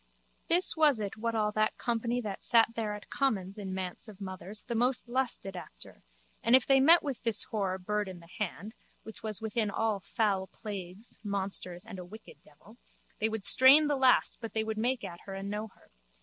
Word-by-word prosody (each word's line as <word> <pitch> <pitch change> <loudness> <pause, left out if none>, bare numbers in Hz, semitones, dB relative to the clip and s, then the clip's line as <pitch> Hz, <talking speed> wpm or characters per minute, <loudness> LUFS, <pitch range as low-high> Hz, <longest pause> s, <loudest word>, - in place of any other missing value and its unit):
This 350 +1 +4
was 300 -7 +4
it 205 -2 -4
what 230 +1 -2
all 210 -1 +1
that 215 +1 0
company 235 +1 -1
that 205 -4 -6
sat 230 -1 +5
there 220 -2 -2
at 210 - -12
commons 205 -7 -1
in 195 -2 -5
Manse 185 +4 -3
of 210 -2 -12
Mothers 195 +1 -7
the - - -5
most 245 +2 +1
lusted 240 -6 -2
after 180 - -11 0.4
and 230 +2 +5
if 260 - +4
they 270 -1 +5
met 325 +6 +6
with 275 -5 -4
this 230 -3 +1
whore 195 -4 -1
Bird 210 +2 -2
in 185 -2 -8
the 170 - -15
Hand 210 +2 -4 0.3
(which 220 +1 -10
was 215 -2 -5
within 220 -1 0
all 215 0 0
foul 195 -1 -1
plagues, 200 +1 -7
monsters 195 -3 -2
and 190 - -8
a - - -6
wicked 215 +5 -13
devil) 175 +10 -19 0.4
they 220 - +1
would 220 -2 -4
strain 270 +8 +7
the 295 -1 +1
last 265 -2 +3
but 230 - -6
they 220 - +1
would 220 0 -3
make 250 +2 0
at 170 0 -7
her 195 - -6
and 195 +1 -5
know 210 +1 -3
her. 200 - -24
215 Hz, 205 wpm, -30 LUFS, 195-235 Hz, 0.4 s, strain